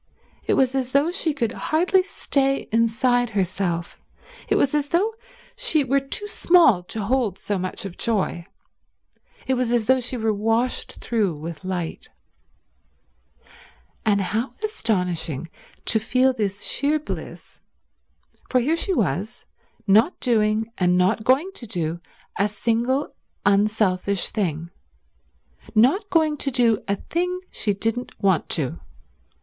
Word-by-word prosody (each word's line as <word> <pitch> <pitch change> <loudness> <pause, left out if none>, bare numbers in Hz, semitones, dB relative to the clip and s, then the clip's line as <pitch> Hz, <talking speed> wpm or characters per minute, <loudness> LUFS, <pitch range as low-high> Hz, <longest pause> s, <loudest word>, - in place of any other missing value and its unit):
It - - +2
was 260 -1 +3
as 260 -1 -2
though 285 +5 +3
she 350 -3 0
could 240 -7 -1
hardly 360 +8 +2
stay 275 -7 0
inside 235 +2 +2
herself, 185 -4 -2 0.5
it - - +3
was 275 - +2
as 295 -1 +1
though 390 +9 +1 0.4
she 480 -12 +1
were 275 +1 +2
too 275 +9 -3
small 340 - +4
to 215 +3 -4
hold 225 -3 0
so 205 -1 -3
much 185 +2 -4
of 185 -3 -8
joy, 195 -6 -1 1.0
it 265 - +1
was 250 -2 0
as 240 -2 +2
though 260 +3 +4
she 250 +1 -5
were 220 -1 +1
washed 225 +4 -1
through 210 -8 0
with 160 +3 -7
light. 180 -3 -4 1.9
And 205 -3 +2
how 220 +7 -2
astonishing 180 - -2 0.3
to 220 - +1
feel 255 +4 +2
this 205 -3 -3
sheer 290 +2 0
bliss, 305 - -8 0.9
for 255 - +3
here 290 +7 +1
she 380 +2 +2
was, 205 - -2 0.4
not 220 - +4
doing 220 -2 +1
and 180 -1 +3
not 190 +5 +2
going 275 - +2
to 235 - -11
do 170 -3 -3 0.4
a 200 - +3
single 235 +6 0 0.3
unselfish 200 -2 +2
thing, 170 -5 -2 1.0
not 295 - +4
going 310 -3 +2
to 275 - -2
do 235 -4 +3
a 200 - +1
thing 360 - -2
she 205 -2 -1
didn't 225 +4 -3
want 190 -4 +1
to 145 -6 +1
do. 85 - -11
225 Hz, 140 wpm, -23 LUFS, 195-270 Hz, 1.9 s, small